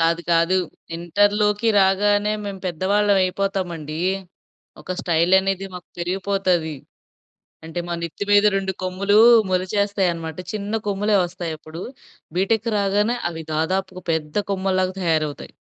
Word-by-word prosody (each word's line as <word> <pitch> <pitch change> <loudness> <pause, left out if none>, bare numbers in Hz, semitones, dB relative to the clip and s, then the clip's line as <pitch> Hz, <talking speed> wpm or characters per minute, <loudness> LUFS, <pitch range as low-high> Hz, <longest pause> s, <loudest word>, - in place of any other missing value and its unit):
కాదు 165 +1 +2
కాదు. 170 +3 +3 0.4
ఇంటర్‌లోకి 205 +5 +2
రాగానే 205 +2 +3
మేము 195 -2 -6
పెద్దవాళ్ళం 200 +4 +2
అయిపోతామండి. 180 -5 -2 0.8
ఒక 185 - -4
స్టైల్ 170 +1 +1
అనేది 195 0 -2
మాకు 180 - -10
పెరిగిపోతది. 180 -3 0 0.9
అంటే 165 +2 -4
మా 170 - -2
నెత్తి 170 +4 -4
మీద 205 +1 +6
2 190 -1 -1
కొమ్ములు 200 +3 +2 0.3
మొలిచేస్తాయి 195 +1 +1
అనమాట. 160 -1 -6 0.2
చిన్న 205 0 -4
కొమ్ములే 205 +1 +1
వస్తాయి 175 -2 -5
అప్పుడు. 160 +3 -9 0.5
బీటెక్ 220 +5 +1
రాగానే 205 +4 +1
అవి 160 -1 -7
దాదాపుగా 185 +3 -1
పెద్ద 150 -2 -3 0.2
కొమ్మల్లాగా 185 -1 0
తయారవుతాయి. 155 -3 -1
185 Hz, 120 wpm, -22 LUFS, 170-200 Hz, 0.9 s, మీద